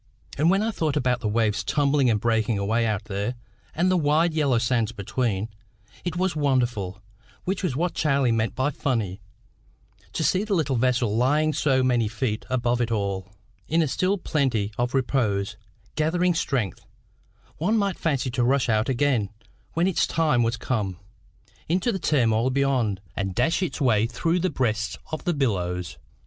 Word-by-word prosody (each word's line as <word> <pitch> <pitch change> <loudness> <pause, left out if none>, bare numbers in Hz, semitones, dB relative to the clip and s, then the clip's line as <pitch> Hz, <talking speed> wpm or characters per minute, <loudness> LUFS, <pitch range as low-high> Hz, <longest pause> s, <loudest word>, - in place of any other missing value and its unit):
And 155 +4 +3
when 195 +3 +3
I 225 - 0
thought 155 -7 -1
about 125 -3 +1
the 110 - -2
waves 105 -1 +1
tumbling 140 -3 +2
and 110 -2 +2
breaking 110 -1 +1
away 110 +4 +1
out 105 -2 -1
there, 100 +5 -3 0.4
and 180 +3 +2
the 185 - +3
wide 160 +2 +2
yellow 145 -6 +2
sands 115 -2 +1
between, 110 -1 -2 0.6
it 175 -2 -3
was 185 -1 0
wonderful 120 -9 0 0.4
which 190 +1 -2
was 175 -10 -1
what 175 +4 0
Charlie 140 -5 +2
meant 115 0 0
by 135 +3 +1
funny 115 - -2 0.9
to - - -1
see 185 +6 +2
the 210 -2 0
little 145 -6 +1
vessel 125 -3 +1
lying 150 +6 +2
so 135 -3 +2
many 120 -3 +2
feet 110 0 -2
above 120 -1 +1
it 120 - 0
all, 100 -3 -2 0.4
in 165 +1 +2
a - - 0
still 185 +8 +1
plenty 130 - 0
of 120 +4 -1
repose, 110 -6 0 0.4
gathering 175 +4 +1
strength, 135 - -2 0.7
one 210 +8 +1
might 200 -3 0
fancy 140 -5 0
to 125 0 0
rush 130 +1 +2
out 110 +2 +2
again, 130 -5 +1 0.4
when 170 +2 +2
its 190 -2 +2
time 150 -6 +2
was 115 0 +1
come, 100 -8 -2 0.7
into 185 +8 +1
the 190 - -3
turmoil 120 -7 +2
beyond, 130 -7 +1
and 95 -2 -3
dash 145 +10 +1
its 185 - -2
way 115 -6 +3
through 165 +9 0
the 185 +2 +1
breasts 115 -6 -1
of 155 - -5
the 175 - +1
billows. 90 - -1
130 Hz, 170 wpm, -25 LUFS, 110-155 Hz, 0.9 s, And